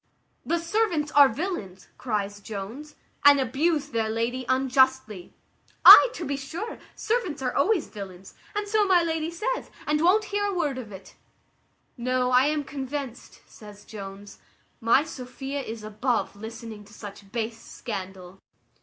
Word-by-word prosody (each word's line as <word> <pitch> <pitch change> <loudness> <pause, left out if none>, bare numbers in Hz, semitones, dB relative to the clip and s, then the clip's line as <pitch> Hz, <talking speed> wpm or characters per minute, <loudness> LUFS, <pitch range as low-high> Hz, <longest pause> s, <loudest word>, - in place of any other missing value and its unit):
"The 340 - 0
servants 335 -4 0
are 285 -2 +7
villains," 220 - -5
cries 205 -4 -2
Jones, 220 +9 -8 0.3
"and 285 -1 +7
abuse 290 +4 0
their 225 -4 -1
lady 235 +3 -2
unjustly." 260 -6 +1 0.5
"Ay, - - +12
to 345 - -5
be 280 - -2
sure, 330 +11 -6 0.2
servants 430 - -1
are 250 - -1
always 365 +4 +2
villains, 190 -2 -10 0.2
and 415 0 -2
so 420 0 +2
my 360 -2 +4
lady 325 -1 -1
says, 435 +9 -3 0.2
and 300 +1 +1
won't 390 +6 +4
hear 410 0 +1
a 400 -2 -2
word 295 -7 -1
of 220 -5 -9
it." 190 -1 -11 0.8
"No, 250 +1 0
I 255 +2 +5
am 300 -1 0
convinced," 275 -2 -6
says 210 -1 -14
Jones, 200 -1 -10 0.4
"my 230 +5 +4
Sophia 270 -1 -6
is 225 -4 -7
above 215 +2 -1
listening 220 0 -9
to 210 - -18
such 200 -1 -11
base 225 0 -4
scandal." 190 -4 -8
260 Hz, 145 wpm, -26 LUFS, 215-315 Hz, 0.8 s, Ay